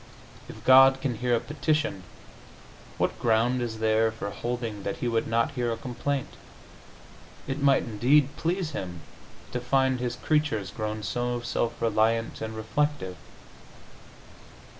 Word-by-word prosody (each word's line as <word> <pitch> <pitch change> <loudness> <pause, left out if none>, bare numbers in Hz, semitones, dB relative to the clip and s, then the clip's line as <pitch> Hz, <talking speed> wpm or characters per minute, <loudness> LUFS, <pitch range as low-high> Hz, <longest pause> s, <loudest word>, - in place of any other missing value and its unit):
If 110 - -11
God 135 +1 +7
can 135 -2 -1
hear 125 -1 +2
a - - +1
petition, 150 - -1 1.0
what - - -1
ground 120 +2 +2
is 115 -2 -3
there 110 0 +2
for 100 -2 -5
holding 120 -3 -4
that 100 - -3
He 125 - -2
would 115 -1 0
not 115 +3 +1
hear 120 -4 -1
a 115 - -2
complaint? 130 +3 -3 1.1
It 135 +2 -4
might, 140 -1 +4
indeed, 130 +6 +2
please 170 -1 -1
Him 90 - -6 0.5
to 125 - -2
find 130 +1 +1
His 120 -1 -2
creatures 145 - 0
grown 110 -1 -4
so 120 +3 -1
self 120 0 -2
reliant 115 0 +1
and 110 0 -4
reflective. 110 -2 -1
120 Hz, 140 wpm, -27 LUFS, 110-135 Hz, 1.1 s, God